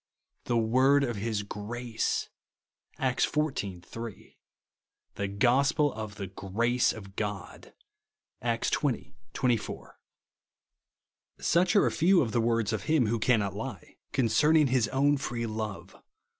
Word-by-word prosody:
17); 120 - +2
"the - - -2
word 135 +4 +4
of 120 -5 -2
his 105 0 -2
grace!' 115 +3 -3 0.7
(Acts 130 -2 +1
xiv. 105 - -1
3); 115 +2 -9 0.4
" - - -58
the 100 - -3
gospel 135 +8 +2
of 110 -1 -6
the 100 - -5
grace 110 +6 0
of 100 -3 -10
God/' 105 -2 -5 0.7
(Acts 115 0 0
xx. 115 - -1 0.2
24.). 120 -4 -2 1.4
Such 175 +5 +2
are 200 - +6
a - - +1
fev/ 180 +3 +4
of 115 - -3
the 120 - +1
words 115 -2 +1
of 110 - -3
Him 155 -6 +3
who 115 +2 0
cannot 105 -5 +2
lie, 110 - -7
concerning 140 +5 +3
his 125 -4 +2
own 140 +4 +2
free 120 -4 -3
love. 110 -2 -5
115 Hz, 135 wpm, -29 LUFS, 105-135 Hz, 1.4 s, are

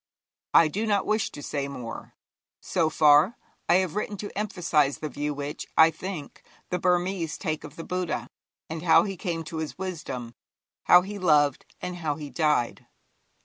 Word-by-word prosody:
I 165 - +8
do 210 +8 -2
not 205 -2 +2
wish 215 0 +1
to 145 - -10
say 140 -2 -2
more. 125 -4 -8 0.4
So 165 -3 0
far, 155 +7 +5 0.3
I 175 - +6
have 185 -3 +2
written 210 0 -3
to 205 +1 -7
emphasize 170 -8 +1
the 155 - -5
view 145 +2 -3
which, 145 0 -5
I 160 0 +8
think, 180 -5 -7 0.3
the 180 - 0
Burmese 180 -2 0
take 155 0 -3
of 150 -1 -10
the 165 - -7
Buddha, 175 -10 -3 0.4
and 160 0 -5
how 165 -1 +6
he 195 -2 -4
came 170 -3 -3
to 160 +1 -7
his 160 -1 -4
wisdom, 155 -10 -5 0.5
how 180 0 +7
he 200 +2 -6
loved, 150 -6 +3
and 180 0 -4
how 155 -4 -2
he 145 -2 -8
died. 150 -3 0
160 Hz, 175 wpm, -26 LUFS, 150-185 Hz, 0.5 s, I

